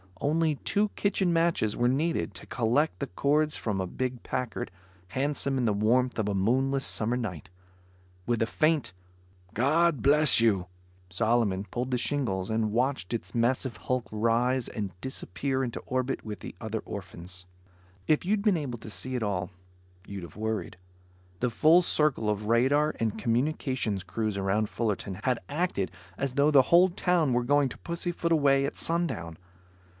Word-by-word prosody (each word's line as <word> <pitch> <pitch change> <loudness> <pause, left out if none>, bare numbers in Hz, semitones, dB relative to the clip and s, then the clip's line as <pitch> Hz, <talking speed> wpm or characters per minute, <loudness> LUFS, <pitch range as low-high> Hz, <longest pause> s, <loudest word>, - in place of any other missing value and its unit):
Only 155 +1 +1
two 205 +7 0
kitchen 200 -3 0
matches 165 -11 +1
were 120 - +2
needed 155 +7 0
to - - -7
collect 120 - 0
the - - -2
cords 150 - +1
from 105 -4 -2
a 95 - -2
big 125 +4 -3
Packard, 125 -7 -4 0.4
handsome 140 +3 -1
in 125 - +1
the 110 - +2
warmth 120 +5 +2
of 105 -1 0
a 100 - -1
moonless 130 +7 +1
summer 115 +3 +1
night. 95 - -5 0.8
With 120 -2 +1
a - - +4
faint 155 - +1 0.6
"God 150 +3 +2
Bless 145 -1 +6
You," 100 -6 +2 0.4
Solomon 105 0 +1
pulled 125 +4 -4
the 125 - +2
shingles 115 -11 -1
and 110 -1 0
watched 120 -3 0
its 115 - -4
massive 120 +1 0
hulk 125 -2 -2
rise 115 +3 +1
and 95 -5 -5
disappear 130 +1 -2
into 120 -2 -3
orbit 130 +1 -2
with 105 -1 -7
his - - -7
other 110 0 -3
orphans. 90 -2 -9 0.6
If 155 - +3
you'd 200 +2 +1
been 205 -5 +3
able 130 -6 -4
to 110 - -9
see 130 +4 -4
it 120 - -1
all, 95 -4 -2 0.6
you'd 100 -2 -6
have 85 - -10
worried. 110 -2 -3 0.6
The 125 - +2
full 155 +9 +5
circle 150 -10 +1
of 105 0 -2
radar 140 +7 +3
and 110 -2 -1
communications 120 -4 -1
crews 110 +1 -2
around 100 +2 0
Fullerton 105 -4 -2
had 125 -2 +1
acted 145 - -1 0.3
as 135 -2 -2
though 145 +1 +4
the 140 -3 +7
whole 175 +6 +5
town 175 -6 +1
were 120 0 +2
going 145 +2 +3
to - - -9
pussyfoot 170 0 -3
away 140 -3 +4
at 140 - -4
sundown. 160 - -1
125 Hz, 165 wpm, -28 LUFS, 110-145 Hz, 0.8 s, the